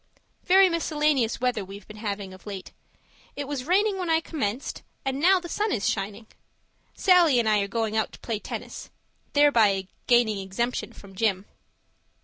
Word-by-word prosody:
Very 380 +1 +6
miscellaneous 300 -7 +1
weather 250 -4 0
we're 195 +1 -10
having 200 -3 -5
of 185 +2 -15
late. 195 -2 -7 0.6
It 285 -1 -4
was 275 -3 -4
raining 390 +4 +2
when 360 -2 -3
I 320 0 +4
commenced 275 -7 -4 0.2
and 270 0 -1
now 370 +5 +5
the 350 - -8
sun 420 +4 -1
is 205 - 0
shining. 205 +2 -3 0.7
Sallie 350 -8 +5
and 235 -2 +2
I 215 -1 +4
are 200 - -1
going 220 +1 -2
out 220 - 0
to - - -12
play 225 -3 -3
tennis - - -7 0.4
thereby 225 -10 +4 0.2
gaining 240 -4 +3
exemption 195 +6 -3
from 200 -1 -14
Gym. 195 -1 0
235 Hz, 160 wpm, -26 LUFS, 205-310 Hz, 0.7 s, Very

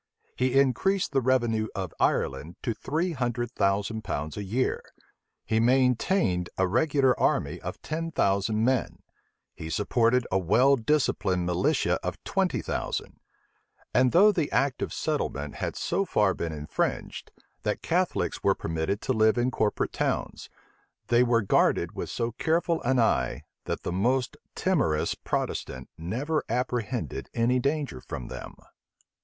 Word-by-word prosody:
He 130 +1 +2
increased 185 +9 +2
the 135 -2 +2
revenue 120 -4 +1
of 95 -4 -4
Ireland 70 +6 0
to 115 - 0
three 160 +10 -2
hundred 120 -4 -2
thousand 105 +1 0
pounds 75 -5 -4
a 105 - -4
year: 115 +7 -1 0.6
he 110 - +1
maintained 125 - +2
a 95 - +2
regular 135 - +3
army - - +1
of - - -6
ten 165 +1 -3
thousand 105 -5 +1
men: 130 -1 0 0.5
he 80 - -7
supported 115 +7 +2
a 95 - +3
well 115 +10 +4
disciplined 110 -9 +1
militia 90 0 +1
of - - -3
twenty - - 0
thousand: - - -4 0.7
and 125 0 +4
though 205 +5 +7
the 165 -7 -1
act 140 -2 +1
of - - -2
settlement 70 +1 -2
had - - -3
so 185 +3 0
far 105 - +2
been 85 - -4
infringed, 75 -1 -3 0.3
that - - -2
Catholics - - 0
were - - +3
permitted 80 +5 -2
to 130 - 0
live 110 0 +3
in 120 +1 +1
corporate 105 -4 0
towns, - - -2 0.6
they 120 0 +5
were 120 -2 +3
guarded 95 - +2
with - - -5
so 115 0 -2
careful 165 +6 0
an 130 +2 +1
eye, 85 - +1 0.2
that - - -3
the - - -2
most 125 +8 0 0.2
timorous 135 - +1
Protestant 65 -1 -4
never 130 - -2
apprehended 120 0 -2
any 120 +2 +2
danger 140 - -2
from 60 - -7
them. - - -8
120 Hz, 145 wpm, -27 LUFS, 95-135 Hz, 0.7 s, though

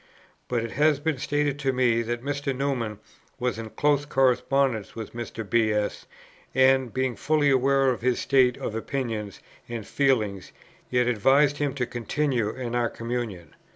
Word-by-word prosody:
But 120 -2 -1
it 115 - -5
has 150 0 +3
been 150 -2 -1
stated 145 0 0
to 135 -2 +1
me, 125 -3 +2
that 120 +1 -3
Mr. 140 -2 -2
Newman 125 -6 -2 0.4
was 125 -3 -2
in 110 -1 -6
close 145 +3 +1
correspondence 135 -4 +1
with 110 -2 -7
Mr. 115 -2 -6
B. 110 0 +2
S., 105 -1 -2 0.5
and, 130 -2 +4
being 130 0 -1
fully 150 -2 +2
aware 135 0 +3
of 120 - -4
his 125 0 +1
state 130 -3 +3
of - - -4
opinions 115 -3 -4 0.3
and 115 -3 -5
feelings, 110 -10 0 0.4
yet 125 -1 +2
advised 135 +5 +3
him 145 -2 -1
to 125 -3 -1
continue 120 -1 -1
in 120 +1 -5
our 120 -1 +1
communion. 115 -8 -5
125 Hz, 160 wpm, -26 LUFS, 115-140 Hz, 0.5 s, and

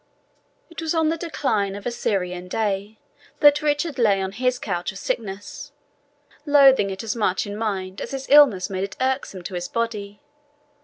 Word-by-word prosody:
It 335 - -7
was 325 +1 -1
on 320 -1 +2
the 325 - 0
decline 220 - -1
of 200 - -9
a 245 - -1
Syrian 180 -6 -2
day 205 +1 -2 0.4
that 290 0 +6
Richard 295 -1 -1
lay 205 -4 +3
on 190 0 -2
his 250 +4 0
couch 175 -7 -3
of 195 - -11
sickness, 200 -1 -5 0.7
loathing 275 -8 +5
it 190 +1 -5
as 225 - -2
much 190 -5 0
in 205 0 -6
mind 195 -3 -3
as - - -5
his 270 -1 -5
illness 275 -11 +6
made 190 -1 -3
it 195 - -6
irksome 260 -8 -2
to 185 - -7
his 175 0 -3
body. 210 -3 -3
215 Hz, 175 wpm, -23 LUFS, 195-270 Hz, 0.7 s, that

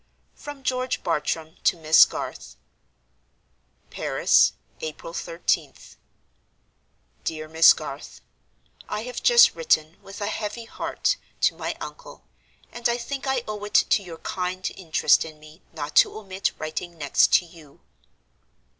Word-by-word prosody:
From 290 -2 -10
George 255 0 -1
Bartram 160 0 -2
to 180 - +3
Miss 160 -1 +7
Garth. 65 - -7 1.4
"Paris, - - +3 0.3
April 160 +1 -7
13th. 170 0 -3 1.3
"DEAR 155 -1 -4
MISS 160 +1 +7
GARTH, - - -8 0.7
"I 210 - -3
have 250 0 -6
just 480 -1 +7
written, 165 - +1
with 195 +1 -11
a 205 - -2
heavy 215 +2 -4
heart, - - -2 0.2
to - - +4
my - - -4
uncle, - - -10 0.5
and 240 0 -1
I 235 - +1
think 270 +3 -5
I 265 -2 0
owe 210 -1 -5
it 205 - -7
to - - +4
your 175 -4 -9
kind 185 +2 -3
interest 165 -4 +2
in 155 -1 -11
me 155 +3 -16
not 150 -2 -6
to - - +5
omit 195 -2 -3
writing 165 +2 -5
next 145 -3 +3
to 180 - +5
you. 165 -4 -17
180 Hz, 135 wpm, -24 LUFS, 160-235 Hz, 1.4 s, Miss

